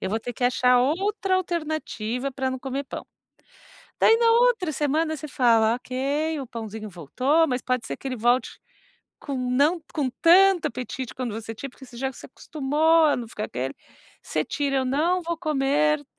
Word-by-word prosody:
eu 190 - -3
vou 220 +3 -1
ter 245 - -5
que 245 - -3
achar 250 0 +4
outra 380 - 0
alternativa 310 - -3
pra 260 0 -2
não 260 - -4
comer 270 +2 -4
pão. - - -8 0.9
Daí 450 - +6
na 465 0 +4
outra 465 -8 +3
semana 310 +2 0
você 305 +1 -7
fala: 230 -4 +3
"Ok, 280 +5 -2
o 270 - -6
pãozinho 220 -2 -7
voltou", 255 - +1
mas 250 -2 -1
pode 250 -2 -1
ser - - -4
que - - -7
ele 255 - -3
volte 240 +3 +1 0.6
com 280 -2 -4
não 270 +7 +1
com 280 -5 0
tanto 370 +1 +6
apetite 255 +1 -5
quanto 250 -3 -4
você 225 +1 -6
tinha, 275 +5 -7
porque 265 - -15
você 245 -1 -14
já 265 +2 -2
se - - -12
acostumou 310 +4 +1
a 295 - +3
não 235 -2 -6
ficar 215 -1 -5
aquele, 130 +2 -4 0.5
você - - -2
tira 275 -2 -1
ou 260 - -1
"não 325 +8 +1
vou 340 0 -3
comer, 300 -1 +1
270 Hz, 185 wpm, -24 LUFS, 250-315 Hz, 0.9 s, Daí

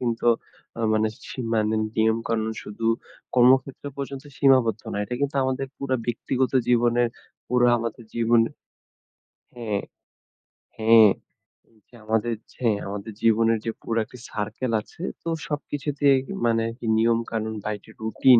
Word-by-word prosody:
কিন্তু 120 -1 -1 0.5
আ - - -3
মানে, 110 0 +2 0.2
সিমানেন 110 -3 0
নিয়মকানুন 110 0 +1
শুধু 110 +2 -5 0.5
কর্মক্ষেত্রে 130 +3 +4
পর্যন্ত 140 0 -5
সীমাবদ্ধ 120 -5 +4
নয়। 105 - -1
এটা 125 - -4
কিন্তু 140 0 0
আমাদের 130 +1 -1
পুরা 130 -2 -1
ব্যক্তিগত 125 +2 0 0.2
জীবনের 120 0 +3 0.4
পুরা 125 0 +3
আমাদের 115 0 -5
জীবনে 115 0 +3 1.1
হ্যাঁ, 110 -4 -2 1.0
হ্যাঁ, 110 -1 +7 0.8
হ্যাঁ 120 -2 -15
আমাদের 110 +1 +1 0.2
ছে 125 - -1 0.2
আমাদের 100 +2 -5
জীবনের 115 0 +4
যে 115 - 0
পুরো 115 - -2
একটা 125 - -13
circle 110 +4 -3
আছে 165 - -12 0.2
তো 165 - -3 0.2
সবকিছুতেই 145 -1 +1 0.3
মানে 115 -1 +3
আরকি 115 +1 -6
নিয়ম 115 0 +3
কানুন 110 -1 -2
বা - - -2
একটি 110 - -17
রুটিন 120 +3 +5
115 Hz, 130 wpm, -25 LUFS, 110-130 Hz, 1.1 s, হ্যাঁ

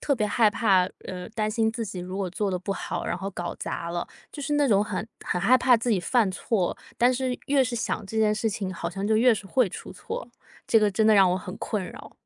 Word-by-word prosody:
特 280 - +2
别 215 -5 0
害 215 +1 +3
怕， 195 -4 +3 0.2
呃， 180 -1 -6
担 215 -1 0
心 220 0 +1
自 230 - -4
己 190 - -6
如 185 +1 -6
果 195 -2 -1
做 200 +3 -2
得 180 - -1
不 195 +2 -3
好， - - -4
然 170 - -1
后 195 +2 -5
搞 175 -2 -5
砸 170 - -4
了， 170 0 -3 0.2
就 290 - -7
是 295 - -2
那 290 -1 +3
种 205 -2 +4
很 210 +1 -4 0.2
很 180 - -1
害 245 +7 +5
怕 255 0 +4
自 235 - -3
己 215 -5 +3
犯 210 +3 +2
错， 185 0 -1 0.2
但 245 +2 +5
是 255 0 -2
越 275 -1 +3
是 250 -1 -3
想 225 -2 -2
这 220 +3 -4
件 215 -1 +3
事 220 +1 0
情， 195 -2 -3
好 170 -1 -4
像 195 +2 -3
就 220 - +3
越 235 +1 +5
是 205 - -7
会 250 +4 +2
出 185 - -8
错。 475 +2 -6 0.4
这 225 - +5
个 210 -1 +3
真 215 +3 +2
的 220 - +6
让 195 -2 +6
我 180 - +1
很 185 +1 -8
困 210 -3 -3
扰。 - - -12
210 Hz, 285 characters per minute, -26 LUFS, 190-235 Hz, 0.4 s, 的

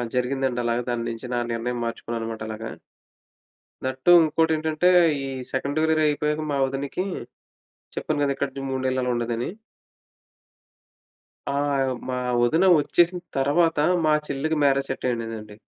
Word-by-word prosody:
జరిగిందండలాగా. 125 -2 0
దాని 120 -1 -1
నించి 115 +2 -6
నా - - +1
నిర్ణయం 120 +1 -2
మార్చుకున్నానమాటలాగా. 115 -1 -5 1.1
దట్ 130 0 -3
టూ 175 - +7
ఉంకోటేంటంటే, 160 +1 +2 0.4
ఈ - - -4 0.3
సెకండూరియర్ 155 +4 +1
అయిపోయాక 150 +1 0
మా 140 - 0
ఒదినికీ 140 +7 -3 0.9
చెప్పాను - - -1
గదా 140 - 0
ఇక్కడ 140 0 -2 0.2
3 130 0 -2
నెలలు 130 0 0
అలా 125 - 0
ఉండేదని. 120 +1 -2 2.0
ఆ! - - -2 0.6
మా 125 - -1 0.3
ఒదిన 160 +10 +3
ఒచ్చేసిన 175 +4 +2 0.2
తర్వాతా 150 +2 +2 0.2
మా 155 - +4
చెల్లికి 155 +3 -1
మ్యారేజ్ 140 -1 +2
సెట్టయ్యుండేదండి. 115 -5 -4
135 Hz, 115 wpm, -24 LUFS, 120-155 Hz, 2.0 s, టూ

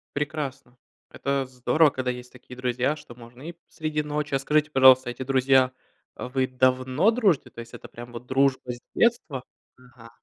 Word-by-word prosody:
Прекрасно! 140 -4 -4 0.3
Это 140 -1 -2
здорово, 130 +5 +2
когда 130 -2 -2
есть 125 0 -9
такие 125 0 -13
друзья, 125 +3 0
что 120 -5 -13
можно 120 +2 -14
и - - -8 0.2
среди 155 -1 -3
ночи 150 -1 -3
А 135 - +2
скажите, 150 +2 +1
пожалуйста, 130 -2 +6
эти 120 +2 -5
друзья, 130 -1 +3 0.4
вы 130 +1 -2
давно 130 - +2
дружите? 210 - +1
То - - -13
есть 115 0 -13
это - - -10
прям 120 +1 -11
вот 120 +1 -9
дружба 130 -1 +1
с 120 - -8
детства? 225 - +1 0.3
Ага. 125 -2 -17
130 Hz, 170 wpm, -25 LUFS, 125-145 Hz, 0.4 s, пожалуйста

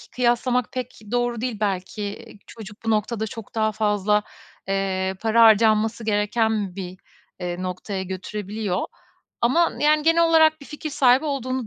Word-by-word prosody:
kıyaslamak 245 0 +1
pek 255 -1 -6
doğru 240 -1 0
değil 245 -4 -3
belki. 205 +2 -3 0.2
Çocuk 210 -2 -11
bu - - 0
noktada 220 +1 0
çok 225 -1 -10
daha 220 -1 +1
fazla, 210 -1 +1 0.4
eee, 190 -1 -1
para 225 +1 +3
harcanması 220 +1 +4
gereken 210 -2 0
bir, 185 -1 -7 0.4
eee, 180 0 -4
noktaya 185 +1 -4
götürebiliyor 195 +1 -4 0.6
ama, 305 +9 +3
yani, 300 +1 +3
genel 330 +2 +4
olarak 315 -1 +4
bir 280 - -12
fikir 305 +1 -6
sahibi 265 +1 +4
olduğunu 260 -3 -2
220 Hz, 140 wpm, -23 LUFS, 200-250 Hz, 0.6 s, harcanması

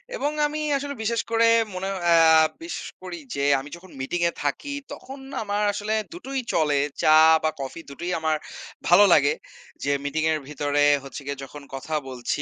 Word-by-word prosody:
এবং 295 -11 -1 0.2
আমি 305 +1 -4 0.2
আসলে 280 +1 -5
বিশেষ 230 +1 0
করে 230 0 +4 0.3
মনে 185 +1 -4 0.2
আ - - +7 0.5
বিশ্বাস 335 - -6
করি - - -7 0.2
যে 140 - -1 0.2
আমি 140 +2 -9
যখন 175 +2 -15
মিটিং 170 +7 -2
এ - - -6
থাকি 145 - -2 0.2
তখন 270 +1 -10 0.2
আমার 205 0 -1
আসলে 210 +1 -2 0.2
দুটোই 275 -6 -4
চলে। 150 -3 +2 0.2
চা 155 - +6 0.3
বা 155 - +3
কফি 135 +5 -6
দুটোই 175 +6 -5
আমার 160 -1 +1 0.5
ভালো 180 +4 +7
লাগে। 145 -1 +4 0.5
যে 140 - +1
মিটিং 155 +2 -1
এর 155 - 0
ভিতরে 145 0 0 0.2
হচ্ছে 135 +1 -8
গিয়ে 140 -1 -5
যখন 145 +2 -10
কথা 135 +4 -6 0.2
বলছি 125 +2 -3
160 Hz, 175 wpm, -24 LUFS, 145-225 Hz, 0.5 s, আ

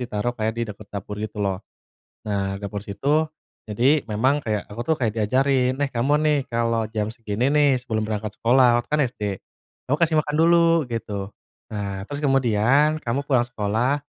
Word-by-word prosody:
ditaruh 120 +1 -2
kayak 110 -1 -1
di - - 0
deket 105 0 -14
dapur 105 0 -6
gitu 105 -1 -6
loh. 100 -1 -1 0.7
Nah, 100 -1 -2
dapur 100 0 -5
situ. 145 +10 +1 0.4
Jadi 130 +8 +2
memang 130 +8 +1
kayak 105 -2 -2
aku 105 +3 -8
tuh - - +4
kayak 115 -4 +1
diajarin, 130 +3 +2
eh 140 - +1
kamu 125 +5 +1
nih 150 -1 +3 0.2
kalau 115 -1 +1
jam 105 -1 -1
segini 115 +1 -1
nih 150 -1 +4
sebelum 115 -3 -2
berangkat 105 -1 -3
sekolah, 120 0 +4
waktu - - -15
itu - - -15
kan - - +1
SD 110 - -14 0.7
kamu 145 - +2
kasih 165 -1 +3
makan 150 -1 -4
dulu 170 0 +5 0.3
gitu. 115 -2 -4 0.6
Nah, 100 -2 -4
terus 145 +6 -6
kemudian 135 +2 +3
kamu 120 +2 -1
pulang 125 -4 +3
sekolah 120 +5 0
120 Hz, 180 wpm, -23 LUFS, 105-135 Hz, 0.7 s, dulu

